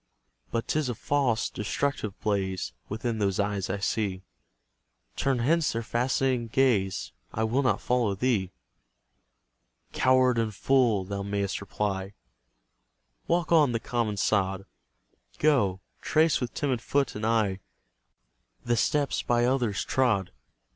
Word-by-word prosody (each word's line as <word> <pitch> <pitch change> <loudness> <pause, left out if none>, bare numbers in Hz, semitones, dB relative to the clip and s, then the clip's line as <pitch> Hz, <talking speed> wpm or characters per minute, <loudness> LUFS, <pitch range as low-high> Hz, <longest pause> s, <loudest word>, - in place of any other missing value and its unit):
But 115 0 -2
'tis 155 -4 0
a 120 - -2
false, 125 -2 +1
destructive 105 0 -3
blaze 95 -4 -1 0.2
Within 110 +1 -2
those 100 -2 0
eyes 100 -2 -1
I 95 - -1
see; 100 -2 -2 0.9
Turn 135 -2 +1
hence 155 +7 +2
their 115 0 -2
fascinating 125 +1 0
gaze; 110 -7 +1 0.2
I 110 - -2
will 115 +5 +1
not 130 -6 +1
follow 120 -5 +1
thee. 100 -4 0 1.4
"Coward 130 -2 +3
and 110 -2 -1
fool!" 120 -6 +2
thou 100 +1 -4
mayst 100 -1 -2
reply, 100 -1 -3 1.1
Walk 170 -1 +1
on 150 -7 +5
the 115 - 0
common 115 -3 -2
sod; 95 -1 0 0.7
Go, 110 -11 +2 0.2
trace 155 -2 +2
with 125 - -4
timid 130 -5 -1
foot 140 +1 0
and 105 - -6
eye 110 -4 +1 1.1
The 120 0 +1
steps 145 +3 +1
by 120 0 +2
others 120 -5 0
trod. 110 -8 +1
115 Hz, 125 wpm, -27 LUFS, 100-130 Hz, 1.4 s, on